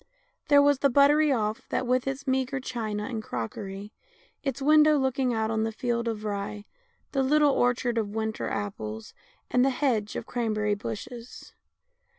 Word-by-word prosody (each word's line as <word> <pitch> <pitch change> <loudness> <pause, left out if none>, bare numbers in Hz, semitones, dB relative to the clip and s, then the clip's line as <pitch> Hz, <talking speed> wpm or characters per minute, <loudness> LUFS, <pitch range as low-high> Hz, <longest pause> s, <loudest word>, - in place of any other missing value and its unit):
There 285 -2 +6
was 285 -2 +3
the 280 - +3
buttery 285 +3 +5
off 215 -3 0
that, 255 - -1
with 255 +1 +1
its 270 +1 -3
meagre 265 0 0
china 215 -5 -3
and 225 0 -4
crockery, 195 - -6 0.5
its 275 -1 -3
window 305 +1 +5
looking 265 -1 +1
out 220 -1 0
on 220 -1 0
the 225 0 0
field 235 +1 -2
of 220 -2 -3
rye, 205 0 -4 0.5
the 275 - +1
little 295 +2 +4
orchard 245 -1 +1
of 210 -2 -2
winter 220 -1 -2
apples, 110 - -5 0.4
and 250 - +4
the 270 - +4
hedge 245 -6 0
of - - -4
cranberry 215 -4 -1
bushes. 230 +4 -7
240 Hz, 160 wpm, -27 LUFS, 215-270 Hz, 0.5 s, There